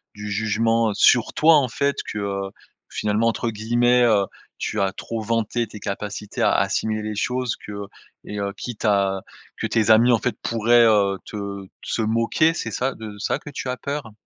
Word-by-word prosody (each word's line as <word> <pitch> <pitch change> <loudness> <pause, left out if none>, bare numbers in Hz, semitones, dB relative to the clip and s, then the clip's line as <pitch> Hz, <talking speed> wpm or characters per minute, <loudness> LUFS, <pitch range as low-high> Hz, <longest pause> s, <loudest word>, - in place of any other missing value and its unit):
du 105 0 -6
jugement, 110 +2 +1
heu, - - -3
sur 120 -2 +4
toi 160 +1 +6
en 140 -3 +2
fait 140 +3 0
que 100 -2 -3 0.4
finalement, 105 +2 0
entre 115 +1 0
guillemets, 120 +3 +2
heu, 105 -4 +4 0.3
tu 110 - -2
as 95 0 0
trop 115 +2 -5
«vanté» 115 +1 -1
tes 105 0 -10
capacités 105 +1 -5
à - - +4
assimiler 110 -1 0
les 105 0 -4
choses 125 +3 -1
que 105 - -9 0.5
et 105 - -6
heu, 100 0 -2
quitte 120 -2 -6
à 100 -2 +2 0.3
que - - -3
tes 110 -1 +1
amis 115 +3 +6
en 115 - +3
fait 125 - -1
pourraient, 115 +1 +4
heu, 100 -3 +3
te 100 -2 -6 0.2
se 115 - -1
moquer, 115 +9 +2
c'est 140 - -4
ça 130 +5 -1
de 110 -2 -8
ça - - -1
que - - -10
tu 135 -2 -5
as 125 - -2
peur? 140 -5 -5
110 Hz, 190 wpm, -23 LUFS, 105-120 Hz, 0.5 s, toi